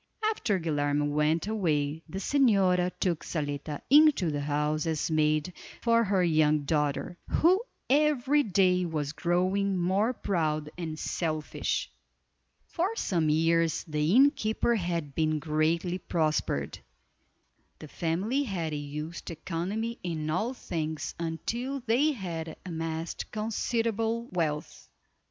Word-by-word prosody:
After 210 - 0
Guilerme 145 -2 0
went 150 +3 +1
away 160 -8 0
the 190 - -5
señora 195 -7 +3
took 175 -4 0
Zaletta 145 -1 -4
into 285 - +5
the 145 -1 -2
house 150 +2 0
as 160 0 -1
maid 155 +2 +1 0.3
for 230 0 +3
her 195 -2 +2
young 155 -3 +3
daughter, 150 +4 -1
who 365 +5 +3 0.3
every 295 0 +3
day 185 -5 +3
was 155 -4 -2
growing 185 +4 +1
more 190 +6 +2
proud 155 -9 -1
and 160 -3 -5
selfish. 155 -2 -2 0.8
For 375 +6 -2
some 170 - 0
years 165 +1 +2
the 150 +4 0
innkeeper 260 -4 +3
had 170 -8 -2
been 155 0 +1
greatly 160 +3 0
prospered. 155 - -1 1.0
The 155 - -10
family 185 - -1
had 175 - -2
used 150 +3 -5
economy 190 +8 -3
in 155 -3 -3
all 220 +10 -1
things 155 -7 -4
until 235 +12 -3
they 265 +7 +3
had 165 - -5
amassed 165 -1 -4
considerable 225 +1 -1
wealth. 155 -4 -3
170 Hz, 115 wpm, -29 LUFS, 155-215 Hz, 1.0 s, into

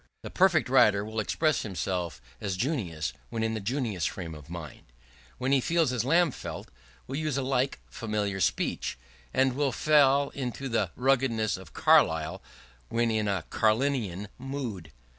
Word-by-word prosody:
The - - -7
perfect 180 -6 +4
writer 105 -6 +4
will 110 +1 -4
express 155 +8 +1
himself 90 - -3 0.2
as 95 -2 -2
Junius, 90 - -2 0.2
when 115 -1 -2
in 110 0 0
the 110 - -2
Junius 110 - -1
frame 85 -4 -6
of 75 0 -12
mind; 85 -3 -8 0.6
when 130 +2 -1
he 140 -1 +4
feels 165 -3 +2
as 120 -3 0
Lamb 165 +4 +3
felt, - - -7 0.4
will 135 - -4
use 155 -3 -1
a 135 - 0
like 130 0 0
familiar 105 -4 -2
speech; - - 0 0.3
and 130 - +2
will 140 0 +1
fall 140 0 +4
into 135 0 -4
the 110 -6 +1
ruggedness 125 -6 +2
of - - -11
Carlyle 80 0 +3 0.5
when 115 0 +1
in 110 -1 0
a 100 -5 -1
Carlylean 110 -4 +1
mood. 125 - -5
115 Hz, 160 wpm, -28 LUFS, 100-135 Hz, 0.6 s, perfect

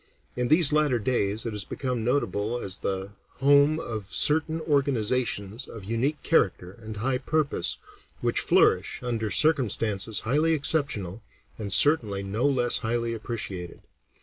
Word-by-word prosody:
In 125 0 -1
these 155 0 +7
latter 150 -5 +2
days 110 -2 0
it 115 - -3
has 105 -2 -5
become 125 0 -4
notable 115 -3 -1
as 95 -3 -4
the 95 0 -4 0.2
home 145 +3 +3
of 110 -7 -5
certain 160 +9 +2
organizations 125 -6 -1
of 110 - -10
unique 115 +9 -2
character 95 - +1
and 110 -1 -8
high 125 +4 -1
purpose, 150 +2 -1 0.4
which - - 0
flourish - - +2
under 115 -3 -2
circumstances 115 -8 +1
highly 150 +8 +1
exceptional, 140 - -1 0.4
and 100 -2 -5
certainly 110 -8 +3
no 105 +7 -1
less 125 -3 +2
highly 115 +1 -2
appreciated. 100 -6 -6
120 Hz, 135 wpm, -26 LUFS, 105-140 Hz, 0.4 s, these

